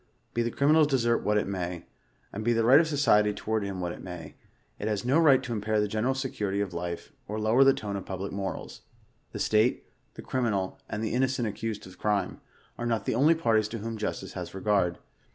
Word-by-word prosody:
Be 120 - +1
the 120 - 0
crimi 140 +5 +2
wtl's 155 -2 +5
desert 120 -4 +2
what 105 0 +1
it 105 - +1
may, 90 -3 -4 0.5
and 105 - -4
be 120 +2 +2
the 115 0 +2
right 130 +5 +8
of 165 - +2
society 115 -9 +3
toward 110 +1 -1
him 100 -2 -4
what 90 -1 -2
it - - -9
may, 90 -4 -8 0.5
it 105 - -3
has 105 0 -1
no 135 +6 +4
right 140 -5 +5
to 120 - -4
impair 110 0 0
the 105 - +1
general 110 +6 0
security 105 -7 -2
of 100 -3 -2
life, 85 0 -5
or 105 +1 -3
lower 110 +5 +4
the 135 - +7
tone 105 -6 -4
of 100 - -4
public 95 +1 -5
morals. 95 -1 -5 0.5
The - - -6
state, 110 +3 +2 0.3
the - - -9
cri 130 - -2
minal, 100 -6 -1
and 105 +1 -3
the 110 - -2
innocent 130 -1 +1
accused 110 0 -4
of 95 0 -14
crime, 105 -3 -1 0.4
are 120 - -2
not 115 -2 -1
the - - 0
only 145 +8 +4
par 115 -9 +2
ties 110 -1 +1
to 115 - -5
whom 115 +1 -5
Justice 110 -1 -4
has - - -6
regard. 95 -3 +1
110 Hz, 230 wpm, -28 LUFS, 100-120 Hz, 0.5 s, right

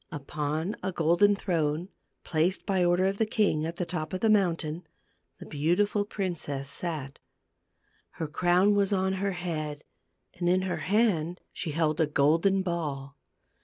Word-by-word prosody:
Upon 150 +5 -3
a 190 - -2
golden 175 +5 +3
throne, 165 -2 -1 0.3
placed, 170 +4 0
by 190 -3 +1
order 175 +1 +3
of 195 +1 -1
the 220 - +3
king, 200 -8 +1
at 165 - -5
the 175 - -2
top 160 -2 -4
of 185 - -3
the 225 - +4
mountain, 170 -4 0 0.5
the - - -10
beautiful 190 +8 +1
princess 150 -9 -4
sat. 150 -6 -4 0.9
Her 160 - -4
crown 180 +6 +3
was 200 -1 +2
on 190 -1 +1
her 200 -1 0
head, 155 -4 -4 0.6
and 175 -1 +1
in 185 +1 +3
her 185 -1 -2
hand 180 -5 +1
she - - -4
held 155 +1 0
a 160 - +3
golden 165 +7 +3
ball. 145 -6 -3
175 Hz, 155 wpm, -28 LUFS, 155-190 Hz, 0.9 s, the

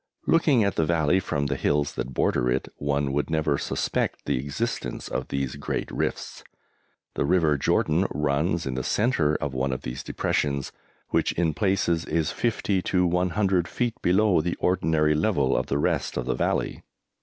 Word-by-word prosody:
Looking 150 -8 +4
at 100 - -1
the 80 - +3
valley 85 +2 +2
from 70 -5 -2
the 70 0 -1
hills 75 +1 0
that 65 - -4
border 60 - +1
it, 65 +2 0
one 70 -1 -1
would 75 +2 -1
never 80 -3 +1
suspect - - -2
the - - 0
existence 70 - -3
of - - -3
these 70 -1 -3
great 70 - -3
rifts. - - -3 0.7
The - - -1
River 80 -1 +3
Jordan 80 +5 +1
runs 75 +4 0
in 65 - -2
the 65 - -2
centre 80 - +1
of 70 -2 -3
one 65 +1 -1
of 65 - -4
these 60 +2 -5
depressions, 70 -2 -1 0.4
which - - +1
in 80 -2 +1
places 90 -3 +1
is 80 -1 0
50 105 -5 0
to 90 0 +1
100 90 +1 +1
feet 120 -2 -1
below 95 -1 +3
the 85 +2 -2
ordinary 80 -4 +2
level 75 -6 +1
of - - 0
the 70 - 0
rest 70 - 0
of 60 - -2
the - - 0
valley. - - -1
80 Hz, 175 wpm, -25 LUFS, 70-90 Hz, 0.7 s, Looking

